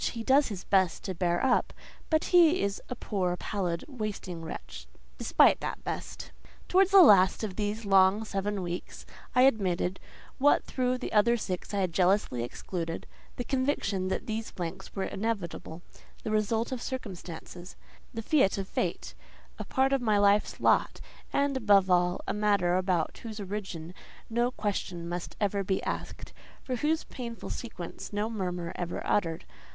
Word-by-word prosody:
He 230 Hz, -2 st, -5 dB
does 275 Hz, +4 st, +4 dB
his 195 Hz, -5 st, -6 dB
best 190 Hz, -3 st, +2 dB
to 190 Hz, -, -3 dB
bear 175 Hz, +3 st, 0 dB
up, 255 Hz, -, +2 dB, 0.4 s
but 315 Hz, -1 st, +2 dB
he 345 Hz, 0 st, +6 dB
is 200 Hz, 0 st, -2 dB
a 250 Hz, -, -3 dB
poor, 185 Hz, -6 st, -1 dB
pallid, 180 Hz, -5 st, -3 dB
wasting 210 Hz, -, -5 dB
wretch, 160 Hz, -, -8 dB, 0.3 s
despite -, -, +5 dB
that -, -, -5 dB
best. -, -, -6 dB, 0.4 s
Towards 380 Hz, +1 st, +4 dB
the 390 Hz, -1 st, +9 dB
last 195 Hz, -, +6 dB
of 200 Hz, -4 st, -3 dB
these 210 Hz, +2 st, -2 dB
long 195 Hz, +2 st, +4 dB
seven 200 Hz, -1 st, -2 dB
weeks 175 Hz, 0 st, -6 dB, 0.3 s
I 250 Hz, -, +6 dB
admitted, 190 Hz, -7 st, +2 dB, 0.4 s
what 290 Hz, +2 st, +4 dB
through 255 Hz, -1 st, -1 dB
the 250 Hz, -, -6 dB
other 235 Hz, +3 st, +4 dB
six 185 Hz, -5 st, -4 dB
I 200 Hz, -1 st, 0 dB
had 180 Hz, -3 st, -1 dB
jealously 180 Hz, -, +2 dB
excluded—the 165 Hz, -, -6 dB
conviction 250 Hz, -8 st, 0 dB
that 190 Hz, -, -2 dB
these 225 Hz, -1 st, -3 dB
blanks 180 Hz, +2 st, -6 dB
were 195 Hz, -, -1 dB
inevitable: 195 Hz, -6 st, -4 dB, 0.4 s
the 215 Hz, -, -3 dB
result 220 Hz, +2 st, 0 dB
of 255 Hz, -2 st, -3 dB
circumstances, 180 Hz, -7 st, -7 dB, 0.4 s
the 225 Hz, -1 st, -5 dB
fiat 240 Hz, -8 st, +3 dB
of 195 Hz, -1 st, -3 dB
fate, -, -, -3 dB, 0.5 s
a -, -, -3 dB
part 265 Hz, +1 st, +1 dB
of 270 Hz, -, +2 dB
my 215 Hz, -3 st, +2 dB
life's 205 Hz, +1 st, +3 dB
lot -, -, +2 dB, 0.3 s
and—above 215 Hz, -9 st, +3 dB
all—a 180 Hz, 0 st, +1 dB
matter 200 Hz, -4 st, +2 dB
about 180 Hz, -3 st, 0 dB
whose 220 Hz, -2 st, -7 dB
origin 190 Hz, -4 st, -5 dB, 0.4 s
no 240 Hz, +2 st, +2 dB
question 190 Hz, -7 st, -3 dB
must 175 Hz, 0 st, -5 dB
ever 200 Hz, -1 st, 0 dB
be 190 Hz, 0 st, -1 dB
asked, -, -, -5 dB, 0.3 s
for 255 Hz, -2 st, -3 dB
whose 310 Hz, +5 st, +1 dB
painful 235 Hz, -2 st, -7 dB
sequence 185 Hz, -8 st, -7 dB
no 210 Hz, +2 st, -1 dB
murmur 180 Hz, -5 st, -3 dB
ever 175 Hz, -1 st, -4 dB
uttered. 165 Hz, -5 st, 0 dB
205 Hz, 155 wpm, -29 LUFS, 180-235 Hz, 0.5 s, the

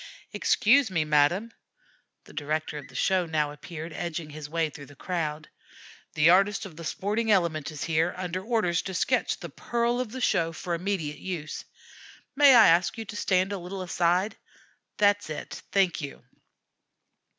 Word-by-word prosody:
"Excuse 245 Hz, +2 st, +3 dB
me, 165 Hz, -4 st, 0 dB
madame." 155 Hz, +10 st, +2 dB, 0.7 s
The -, -, -16 dB
director 155 Hz, 0 st, -3 dB
of 145 Hz, -, -11 dB
the 130 Hz, -, -17 dB
show 185 Hz, +4 st, +1 dB
now 150 Hz, -2 st, 0 dB
appeared, 160 Hz, +2 st, -8 dB
edging 170 Hz, -3 st, -4 dB
his 150 Hz, -1 st, -8 dB
way 165 Hz, -1 st, 0 dB
through 145 Hz, -1 st, -11 dB
the 145 Hz, -, -15 dB
crowd. 155 Hz, -2 st, -3 dB, 0.7 s
"The 155 Hz, +1 st, +4 dB
artist 195 Hz, +3 st, +3 dB
of 180 Hz, -5 st, -10 dB
the 165 Hz, -, -9 dB
'sporting 210 Hz, +6 st, -2 dB
Element' 170 Hz, -7 st, +2 dB
is 155 Hz, -2 st, -6 dB
here, 165 Hz, +1 st, +1 dB
under 185 Hz, 0 st, -3 dB
orders 210 Hz, -7 st, +1 dB
to 190 Hz, -, -6 dB
sketch -, -, +1 dB
the -, -, -8 dB
'pearl 240 Hz, +1 st, -1 dB
of 250 Hz, -4 st, -3 dB
the 260 Hz, -, -6 dB
show' 165 Hz, -8 st, +1 dB
for 175 Hz, +2 st, -4 dB
immediate 170 Hz, -4 st, -2 dB
use. 170 Hz, -5 st, -5 dB, 0.7 s
May 280 Hz, -2 st, +7 dB
I 225 Hz, -, +8 dB
ask 175 Hz, +6 st, +3 dB
you 225 Hz, -, -5 dB
to 205 Hz, -, -8 dB
stand 190 Hz, -1 st, +1 dB
a 200 Hz, -, -3 dB
little 185 Hz, +2 st, -6 dB
aside? 180 Hz, +3 st, +1 dB, 0.6 s
That's 205 Hz, -3 st, +3 dB
it; 155 Hz, -, -6 dB
thank 190 Hz, -5 st, +2 dB
you. 140 Hz, -1 st, -8 dB
175 Hz, 170 wpm, -27 LUFS, 155-200 Hz, 0.7 s, I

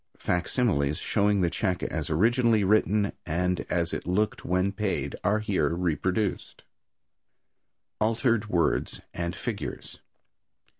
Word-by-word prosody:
Facsimiles 90 Hz, -, 0 dB
showing 100 Hz, -1 st, +1 dB
the 85 Hz, -2 st, +1 dB
check 90 Hz, -1 st, -1 dB
as 80 Hz, -3 st, -3 dB
originally 115 Hz, +6 st, +3 dB
written 105 Hz, 0 st, +2 dB
and 90 Hz, +2 st, 0 dB
as 85 Hz, -1 st, 0 dB
it -, -, -4 dB
looked 105 Hz, +4 st, 0 dB
when 90 Hz, +2 st, +1 dB
paid 95 Hz, -9 st, -2 dB
are 105 Hz, +1 st, +3 dB
here 105 Hz, -3 st, 0 dB
reproduced. 90 Hz, +4 st, -1 dB, 1.4 s
Altered 110 Hz, 0 st, +1 dB
Words 85 Hz, -5 st, 0 dB
and 85 Hz, 0 st, -3 dB
Figures. -, -, -5 dB
95 Hz, 110 wpm, -27 LUFS, 85-105 Hz, 1.4 s, originally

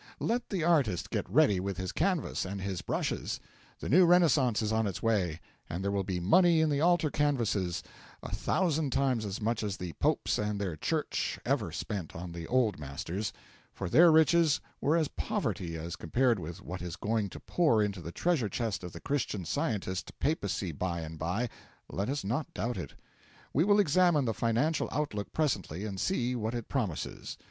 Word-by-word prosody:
Let 240 Hz, +1 st, -1 dB
the 185 Hz, -5 st, -1 dB
artist 140 Hz, -, +2 dB
get -, -, -2 dB
ready 100 Hz, -3 st, +4 dB
with 95 Hz, 0 st, -3 dB
his 95 Hz, 0 st, -3 dB
canvas 185 Hz, -6 st, 0 dB
and 95 Hz, +1 st, -4 dB
his 95 Hz, -2 st, -3 dB
brushes; -, -, -2 dB, 0.4 s
the -, -, -4 dB
new 180 Hz, +8 st, +6 dB
Renaissance 155 Hz, -10 st, +4 dB
is 105 Hz, -, 0 dB
on 110 Hz, -1 st, +2 dB
its 95 Hz, -, -5 dB
way, 95 Hz, -8 st, +1 dB, 0.3 s
and 90 Hz, +4 st, -3 dB
there 100 Hz, -, 0 dB
will 100 Hz, -1 st, 0 dB
be 90 Hz, -1 st, -2 dB
money 170 Hz, -, +5 dB
in 150 Hz, -3 st, +2 dB
altar 170 Hz, -3 st, +3 dB
canvases 115 Hz, -, 0 dB, 0.4 s
a -, -, -6 dB
thousand 155 Hz, -, +1 dB
times 130 Hz, -5 st, +1 dB
as 100 Hz, -1 st, -4 dB
much 115 Hz, +1 st, 0 dB
as 105 Hz, -2 st, -2 dB
the 90 Hz, -3 st, -5 dB
Popes -, -, +1 dB
and 105 Hz, -1 st, -1 dB
their 95 Hz, -5 st, -2 dB
Church -, -, -1 dB
ever -, -, 0 dB
spent 95 Hz, -7 st, -4 dB
on 85 Hz, +1 st, -6 dB
the 85 Hz, -1 st, -6 dB
Old 120 Hz, -8 st, +2 dB
Masters; 80 Hz, +8 st, -4 dB, 0.4 s
for 95 Hz, -, -5 dB
their 170 Hz, -, +7 dB
riches 160 Hz, -1 st, +5 dB, 0.2 s
were 155 Hz, +4 st, +3 dB
as 160 Hz, -3 st, +2 dB
poverty 85 Hz, -9 st, -2 dB
as 85 Hz, +1 st, -5 dB
compared 120 Hz, +6 st, +1 dB
with 85 Hz, 0 st, -7 dB
what 90 Hz, +7 st, -6 dB
is 90 Hz, -2 st, -5 dB
going 110 Hz, -1 st, -1 dB
to -, -, -9 dB
pour 135 Hz, -12 st, +2 dB
into 100 Hz, -3 st, -2 dB
the 85 Hz, +1 st, -6 dB
treasure 150 Hz, -, +1 dB
chest 110 Hz, -8 st, -2 dB
of 90 Hz, -, -7 dB
the -, -, -7 dB
Christian 115 Hz, -10 st, -2 dB
Scientist 100 Hz, -, -2 dB
Papacy 100 Hz, -, -1 dB
by 85 Hz, +2 st, -2 dB
and 80 Hz, 0 st, -7 dB
by, 95 Hz, +9 st, -1 dB, 0.4 s
let 100 Hz, +5 st, -2 dB
us 140 Hz, +1 st, -2 dB
not 125 Hz, +10 st, -2 dB
doubt 120 Hz, +2 st, -1 dB
it. 85 Hz, -7 st, -6 dB, 0.6 s
We 150 Hz, -, +4 dB
will 205 Hz, +2 st, +4 dB
examine 175 Hz, -4 st, +4 dB
the 115 Hz, -, 0 dB
financial 120 Hz, +9 st, +1 dB
outlook 105 Hz, -9 st, -2 dB
presently 105 Hz, -, -1 dB
and 100 Hz, -3 st, -4 dB
see 125 Hz, -, 0 dB
what 115 Hz, 0 st, -2 dB
it 120 Hz, -2 st, -5 dB
promises. 110 Hz, -, -3 dB
110 Hz, 190 wpm, -30 LUFS, 95-145 Hz, 0.6 s, their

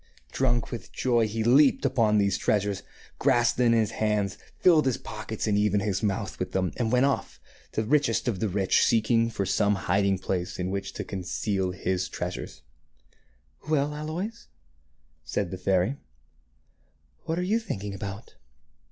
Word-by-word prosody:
Drunk 120 Hz, -3 st, 0 dB
with 120 Hz, -, -7 dB
joy, 120 Hz, -3 st, +2 dB
he 110 Hz, +1 st, -2 dB
leaped 135 Hz, +5 st, +5 dB
upon 115 Hz, -5 st, +3 dB
these 100 Hz, -2 st, +2 dB
treasures, 100 Hz, -2 st, 0 dB, 0.4 s
grasped 120 Hz, 0 st, +3 dB
them 125 Hz, -, +4 dB
in 115 Hz, -, +4 dB
his 110 Hz, -, 0 dB
hands, 105 Hz, -3 st, 0 dB, 0.2 s
filled 160 Hz, -6 st, +5 dB
his 130 Hz, -, +1 dB
pockets 110 Hz, 0 st, -5 dB
and 105 Hz, -2 st, +2 dB
even 105 Hz, -1 st, +2 dB
his 100 Hz, -2 st, -1 dB
mouth 100 Hz, -3 st, -2 dB
with -, -, -3 dB
them, 95 Hz, -1 st, 0 dB
and 115 Hz, -3 st, 0 dB
went 125 Hz, +1 st, +4 dB
off, 140 Hz, -, -2 dB, 0.3 s
the 110 Hz, -, 0 dB
richest 130 Hz, -1 st, +1 dB
of 105 Hz, -6 st, -1 dB
the 110 Hz, -, 0 dB
rich, 95 Hz, 0 st, +2 dB
seeking 115 Hz, 0 st, +3 dB
for 100 Hz, -3 st, -2 dB
some 100 Hz, +2 st, +2 dB
hiding 100 Hz, +1 st, +1 dB
place 90 Hz, -1 st, -3 dB
in 90 Hz, 0 st, -2 dB
which 100 Hz, 0 st, -4 dB
to -, -, -4 dB
conceal 95 Hz, 0 st, -2 dB
his 90 Hz, 0 st, -2 dB
treasures. -, -, -6 dB, 0.5 s
" -, -, -21 dB
Well, 150 Hz, -1 st, +1 dB
Aloys," 170 Hz, +10 st, -5 dB, 0.8 s
said 100 Hz, -4 st, -2 dB
the 95 Hz, -, -4 dB
fairy, 95 Hz, +8 st, +1 dB, 0.6 s
" -, -, -40 dB
what 165 Hz, 0 st, -2 dB
are 180 Hz, -, 0 dB
you 210 Hz, +5 st, +1 dB
thinking 105 Hz, -, -5 dB
about? 100 Hz, +2 st, -7 dB
105 Hz, 170 wpm, -27 LUFS, 95-125 Hz, 0.8 s, leaped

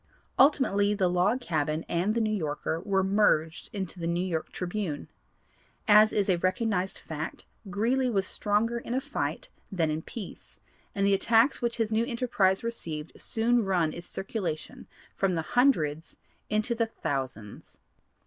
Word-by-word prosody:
Ultimately 210 Hz, -8 st, +4 dB
the 190 Hz, -3 st, +2 dB
Log 180 Hz, +8 st, +2 dB
Cabin 155 Hz, -5 st, -1 dB
and 185 Hz, +6 st, 0 dB
the 235 Hz, -, +2 dB
New 215 Hz, -1 st, +1 dB
Yorker 155 Hz, -2 st, -2 dB
were 195 Hz, +1 st, +1 dB
merged 190 Hz, -5 st, +2 dB
into 190 Hz, -3 st, -5 dB
the 165 Hz, -, -2 dB
New 170 Hz, +2 st, 0 dB
York 165 Hz, -4 st, -3 dB
Tribune. 180 Hz, -4 st, -4 dB, 0.8 s
As 215 Hz, +1 st, +7 dB
is 205 Hz, -2 st, +1 dB
a 180 Hz, -3 st, +2 dB
recognized 185 Hz, +1 st, 0 dB
fact, 155 Hz, 0 st, -6 dB, 0.2 s
Greeley 245 Hz, +6 st, +1 dB
was 195 Hz, -4 st, +1 dB
stronger 220 Hz, +5 st, 0 dB
in 235 Hz, +1 st, -4 dB
a -, -, +2 dB
fight -, -, -4 dB, 0.2 s
than 165 Hz, -5 st, +1 dB
in 155 Hz, +1 st, -2 dB
peace, 205 Hz, +2 st, -8 dB, 0.4 s
and 200 Hz, -1 st, +1 dB
the 200 Hz, -, +4 dB
attacks 230 Hz, +6 st, +3 dB
which 235 Hz, -1 st, -1 dB
this 225 Hz, -2 st, 0 dB
new 220 Hz, +1 st, +2 dB
enterprise 230 Hz, -6 st, +1 dB
received 165 Hz, -10 st, -5 dB
soon 235 Hz, 0 st, +2 dB
run 175 Hz, -5 st, +1 dB
its 170 Hz, +1 st, -8 dB
circulation 190 Hz, -6 st, -5 dB, 0.3 s
from 190 Hz, -2 st, +1 dB
the 165 Hz, -, -1 dB
hundreds 165 Hz, -, +2 dB, 0.3 s
into 215 Hz, +3 st, +1 dB
the 230 Hz, -1 st, 0 dB
thousands. 130 Hz, -, -5 dB
195 Hz, 155 wpm, -28 LUFS, 170-225 Hz, 0.8 s, As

